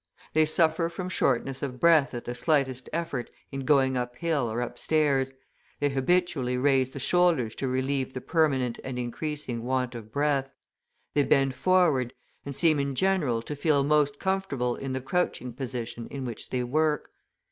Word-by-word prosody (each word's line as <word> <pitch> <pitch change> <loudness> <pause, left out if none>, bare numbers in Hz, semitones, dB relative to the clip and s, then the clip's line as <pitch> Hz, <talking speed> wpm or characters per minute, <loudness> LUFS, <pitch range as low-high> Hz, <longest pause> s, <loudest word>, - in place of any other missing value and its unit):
They 155 0 +4
suffer 165 +1 +2
from 180 +2 -5
shortness 135 -5 0
of 130 -3 -4
breath 155 -5 +4
at 120 - -6
the 120 - -3
slightest 130 -3 +1
effort 155 -7 -3 0.2
in 135 -1 -5
going 135 -3 +3
up 125 0 -3
hill 145 -6 0
or 115 - -2
up 120 - -4
stairs, 140 -4 +2 0.5
they 145 - +2
habitually 135 -2 +1
raise 130 -1 +3
the 140 - -8
shoulders 160 -6 +2
to 135 - -2
relieve 130 +1 -1
the - - -2
permanent 135 -8 +1
and 130 -1 -5
increasing 125 0 -3
want 125 0 -1
of 110 -2 -9
breath; 140 -1 +1 0.6
they 145 - +3
bend 135 -1 +3
forward, 155 -7 +2 0.3
and 140 - -5
seem, 155 -1 +3
in 140 -1 -1
general, 155 -11 +1
to 150 - -5
feel 145 -1 +2
most 145 -1 +2
comfortable 190 -11 -1
in 135 -1 -5
the 130 - -2
crouching 130 -3 -1
position 120 -2 -5
in 135 -2 -6
which 120 -3 -6
they 125 -1 -1
work. 150 +4 0
135 Hz, 170 wpm, -27 LUFS, 125-155 Hz, 0.6 s, They